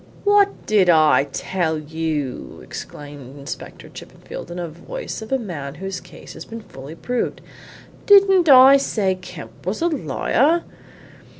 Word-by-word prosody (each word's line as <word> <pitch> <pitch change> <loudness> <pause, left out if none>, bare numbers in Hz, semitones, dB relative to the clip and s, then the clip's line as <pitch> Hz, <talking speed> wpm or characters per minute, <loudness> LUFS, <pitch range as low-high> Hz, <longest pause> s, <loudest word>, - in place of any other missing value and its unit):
"What 405 -1 +3
did 200 -4 +3
I 155 -4 +5
tell 170 -2 -2
you?" 155 -3 -4
exclaimed 145 -2 -10
Inspector 140 - -8
Chippenfield - - -10
in 175 - -7
the 175 -1 -3
voice - - -7
of 220 - -9
a 265 - +3
man 155 - -6
whose 190 +2 -5
case 180 - -13
had - - -11
been 230 0 -7
fully 140 -5 -11
proved. 245 +7 -3 0.7
"Didn't 390 -4 +6
I 265 +1 +9
say 210 -8 0
Kemp 165 -11 -11
was 190 +4 -3
a 335 - +1
liar? 290 - +1
185 Hz, 140 wpm, -21 LUFS, -, 0.7 s, I